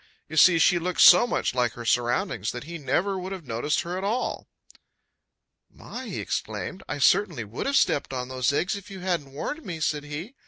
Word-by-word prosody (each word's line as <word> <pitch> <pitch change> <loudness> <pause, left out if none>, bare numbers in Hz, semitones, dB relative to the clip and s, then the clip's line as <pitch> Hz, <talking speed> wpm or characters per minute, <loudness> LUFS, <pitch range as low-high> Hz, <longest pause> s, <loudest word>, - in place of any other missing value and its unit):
You 155 - -8
see 170 +2 +7
she 175 +2 +4
looked 180 +1 -1
so 180 +7 +8
much - - -1
like 125 -3 0
her 120 - -9
surroundings 120 - 0
that 125 - -6
he 170 +3 -8
never 185 +8 0
would 185 +1 -6
have 185 -5 -7
noticed 120 +5 -1
her 180 +2 -4
at - - -6
all. 225 +6 -2 1.2
"My!" - - -9
he - - -5
exclaimed. 190 - -4
"I 145 - -3
certainly 170 - +2
would 110 - -5
have 275 0 +2
stepped 140 - +1
on 125 -1 -4
those 130 0 0
eggs 180 +8 0
if 200 -1 -9
you 190 -2 -9
hadn't 175 -7 -2
warned 295 - -5
me," 165 -3 -6
said 150 -2 -1
he. 150 - -7
165 Hz, 205 wpm, -25 LUFS, 130-190 Hz, 1.2 s, so